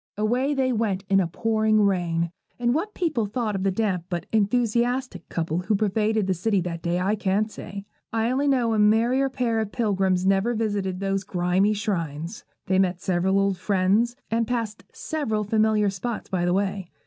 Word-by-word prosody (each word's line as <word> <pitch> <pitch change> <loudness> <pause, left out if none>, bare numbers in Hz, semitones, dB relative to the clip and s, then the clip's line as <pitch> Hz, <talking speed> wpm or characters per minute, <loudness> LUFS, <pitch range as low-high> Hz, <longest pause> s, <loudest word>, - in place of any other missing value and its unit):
Away 250 +7 +1
they 260 -2 +1
went 210 -4 -1
in 195 - +5
a 185 - +1
pouring 220 +4 +1
rain, 170 -4 0 0.3
and 240 0 +1
what 400 +9 -2
people 310 - 0
thought 220 0 -2
of 195 - -2
the 195 - +2
damp 190 -3 -1
but 175 -2 -3
enthusiastic 240 +4 0
couple 165 0 -1
who 185 +4 0
pervaded 215 +1 +1
the 190 - +1
city 195 +3 +1
that 170 -1 -4
day 170 +1 0
I 190 +3 +1
can't 210 +1 0
say; 200 0 -8 0.3
I 225 +1 0
only 275 +3 +1
know 245 -5 +2
a 215 - +1
merrier 235 +6 +3
pair 245 -4 0
of 215 -2 -2
pilgrims 190 -5 +1
never 195 +5 +2
visited 200 -4 -2
those 195 0 -1
grimy 185 +2 +1
shrines. 170 -4 -3 0.2
They 190 0 +2
met 185 -2 +1
several 185 +1 +1
old 195 -1 +1
friends, 205 +5 +2 0.2
and 230 0 +1
passed 230 -3 -3
several 250 -10 -2
familiar 215 -1 +2
spots 210 +4 -5
by 180 -2 0
the 175 - +2
way. 195 -1 -1
205 Hz, 185 wpm, -25 LUFS, 190-230 Hz, 0.3 s, in